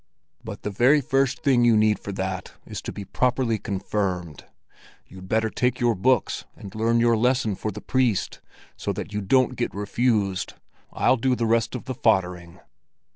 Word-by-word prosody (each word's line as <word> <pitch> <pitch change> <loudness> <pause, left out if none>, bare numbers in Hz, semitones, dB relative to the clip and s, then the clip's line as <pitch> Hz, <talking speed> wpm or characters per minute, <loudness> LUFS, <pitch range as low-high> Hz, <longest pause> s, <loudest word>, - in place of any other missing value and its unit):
"But - - -8
the 105 - -3
very 125 +9 +4
first 135 0 0
thing 130 -4 +4
you 115 -2 +5
need 110 0 +3
for 100 - -6
that 95 -1 -4
is - - -6
to - - -6
be 100 - -7
properly 125 -2 0
confirmed. 95 - -3 0.6
You'd 95 0 -12
better 110 0 +1
take 125 0 0
your 120 -2 +3
books 120 +4 +1
and 100 - -11
learn 115 +2 +1
your 115 0 +4
lesson 125 -1 +1
for 110 - -4
the 105 0 -7
priest, 125 -7 0 0.3
so - - -3
that 105 - -6
you 105 - -2
don't 130 +6 +2
get 120 -6 -3
refused! 105 -2 0 0.4
I'll 130 - +2
do 125 +2 +1
the 120 - -1
rest 115 +2 +1
of 125 - -6
the 130 - -3
foddering." 90 -7 0
110 Hz, 180 wpm, -24 LUFS, 100-125 Hz, 0.6 s, you